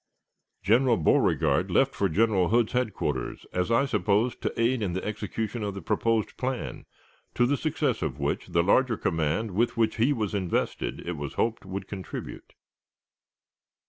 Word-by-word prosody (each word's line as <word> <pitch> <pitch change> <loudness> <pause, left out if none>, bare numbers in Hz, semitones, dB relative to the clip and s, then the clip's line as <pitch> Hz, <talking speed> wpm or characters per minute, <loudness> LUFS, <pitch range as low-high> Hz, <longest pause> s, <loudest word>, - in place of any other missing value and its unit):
General 120 +3 +4
Beauregard 80 - +2
left - - +3
for 100 - 0
General 100 -1 +2
Hood's 115 -1 +2
headquarters, 105 - -2
as 90 +2 0
I 115 +4 +3
supposed, 105 0 +1
to - - -3
aid 120 +1 +2
in 95 -4 -1
the 95 - -3
execution 110 +2 -3
of 100 -2 -3
the 100 - -6
proposed 115 +3 0
plan, 130 -1 -4 0.5
to 120 - +4
the 140 +4 +2
success 150 -4 -1
of 75 -6 -2
which 70 -1 -2
the 85 - +2
larger 115 +5 +3
command 80 +7 -1
with 115 +6 0
which 110 -1 +1
he 120 +6 +3
was 110 -8 -1
invested, 95 -3 -2
it 85 -2 -3
was 70 -1 -5
hoped, 115 -4 -1
would 95 0 -5
contribute. 95 -2 -8
105 Hz, 160 wpm, -27 LUFS, 95-120 Hz, 0.5 s, General